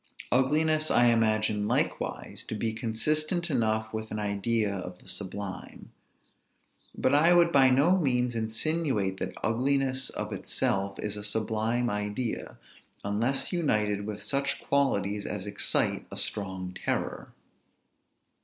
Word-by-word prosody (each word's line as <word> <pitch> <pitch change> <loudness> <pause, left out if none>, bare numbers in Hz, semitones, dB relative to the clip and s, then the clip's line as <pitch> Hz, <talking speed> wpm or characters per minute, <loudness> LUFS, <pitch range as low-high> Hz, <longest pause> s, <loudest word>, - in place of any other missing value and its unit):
Ugliness 155 +4 +2
I 120 0 +5
imagine 110 -2 +1
likewise - - -1
to - - -4
be 110 +1 -1
consistent 155 +10 0
enough 110 -3 0
with 110 0 -4
an 105 - -4
idea 105 +1 0
of 90 -2 -6
the - - -19
sublime. 100 -1 -6 1.1
But 130 - +2
I 165 +4 +5
would 170 -1 +5
by 135 -3 +6
no 150 +9 +4
means 125 -5 +1
insinuate 115 - 0
that - - -4
ugliness 130 +2 +1
of 105 0 -4
itself 100 0 -1
is 105 0 -3
a 105 - -6
sublime 110 +3 0
idea, 105 +3 -3 0.5
unless 115 - 0
united 105 - +1
with 105 -1 -5
such 140 -1 -1
qualities 105 -8 0
as 100 -2 -4
excite 100 -1 0
a - - -8
strong 95 -2 -2
terror. - - -2
110 Hz, 125 wpm, -28 LUFS, 105-135 Hz, 1.1 s, by